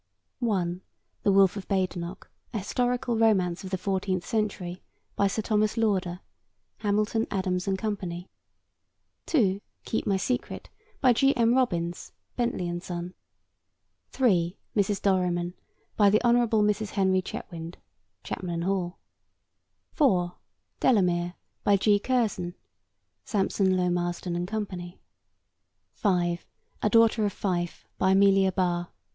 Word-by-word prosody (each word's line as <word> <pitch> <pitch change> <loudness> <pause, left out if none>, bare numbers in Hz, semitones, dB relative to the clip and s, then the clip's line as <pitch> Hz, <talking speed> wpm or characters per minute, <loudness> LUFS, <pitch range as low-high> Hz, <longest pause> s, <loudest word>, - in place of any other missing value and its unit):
(1) 185 -7 0 0.4
The 200 - +3
Wolfe 195 0 +5
of 195 - -7
Badenoch: 185 -2 -2 0.3
A - - +1
Historical 245 +4 0
Romance 190 -6 +2
of 190 - -6
the 190 - -1
Fourteenth 185 -1 -1
Century. 205 -6 -2 0.3
By 200 - +3
Sir 215 +2 -2
Thomas 215 0 +1
Lauder. 190 -5 0 0.6
(Hamilton, 215 +2 0
Adams 185 -2 -1
and 195 -1 +1
Co.) 210 +1 -1 1.3
(2) 205 - +2 0.2
Keep 225 - -2
My 195 -2 +2
Secret. 245 +6 -3 0.3
By 255 -2 +6
G. 270 +4 +3
M. 235 0 +4
Robins. 175 -10 -1 0.2
(Bentley 235 -7 -1
and 175 0 -3
Son.) 175 0 -5 1.0
(3) 185 -8 +2 0.2
Mrs. 200 -1 +1
Dorriman. 180 -2 +1 0.4
By 205 -2 +5
the 210 +2 +4
Hon. 240 -1 +5 0.3
Mrs. 210 0 +1
Henry 190 -2 +2
Chetwynd. 170 -2 -7 0.5
(Chapman 185 - -5
and 170 - -2
Hall.) 185 -1 -1 0.9
(4) 180 - +2 0.5
Delamere. 175 -7 +2 0.3
By 200 -1 +4
G. 205 +1 +3
Curzon. 205 -7 0 0.7
(Sampson 190 -2 +1
Low, 180 -1 +1
Marston 175 0 -2
and 175 +1 -2
Co.) 215 +1 -2 1.3
(5) 175 -4 0 0.4
A 210 - +2
Daughter 225 0 +4
of 205 -2 0
Fife. 175 -3 -2
By 190 0 +4
Amelia 195 -1 +5
Barr. 175 -2 0
195 Hz, 125 wpm, -27 LUFS, 180-215 Hz, 1.3 s, By